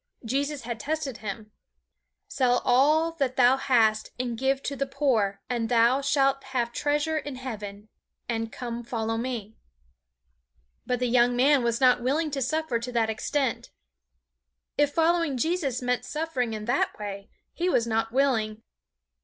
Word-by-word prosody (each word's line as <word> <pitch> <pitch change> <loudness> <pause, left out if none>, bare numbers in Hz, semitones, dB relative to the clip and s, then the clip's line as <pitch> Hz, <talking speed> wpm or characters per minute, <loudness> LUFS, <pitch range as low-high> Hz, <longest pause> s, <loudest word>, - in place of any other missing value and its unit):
Jesus 280 +3 -1
had 235 -1 -5
tested 290 -2 -3
him. 215 +1 -7 0.8
"Sell 250 -2 +1
all 300 +6 +4
that 260 -2 0
thou 250 0 +5
hast 225 -5 +2
and 245 -2 -2
give 265 +3 0
to 280 - -3
the 275 0 -2
poor, 225 -9 0
and 235 -2 -2
thou 240 +3 +4
shalt 275 -1 +2
have 250 -3 -1
treasure 295 +3 0
in 290 -3 -6
heaven; 210 -5 -7 0.4
and 225 -1 -2
come 240 -1 -5
follow 225 -1 -2
me." 225 -3 -4 1.3
But 250 - +1
the 250 +1 0
young 245 0 +3
man 275 +2 +4
was 235 0 0
not 250 -2 +4
willing 300 +5 0
to 275 -1 -2
suffer 275 -2 0
to 245 +2 -5
that 225 -2 +1
extent. 260 +3 -2 1.1
If 290 0 +2
following 330 -3 +2
Jesus 280 -4 -1
meant 250 0 0
suffering 295 -7 -2
in 215 0 -6
that 245 +4 0
way, 200 -1 -7 0.2
he 355 +2 -1
was 235 -9 +2
not 225 0 -1
willing. 225 -5 +1
250 Hz, 155 wpm, -26 LUFS, 230-280 Hz, 1.3 s, thou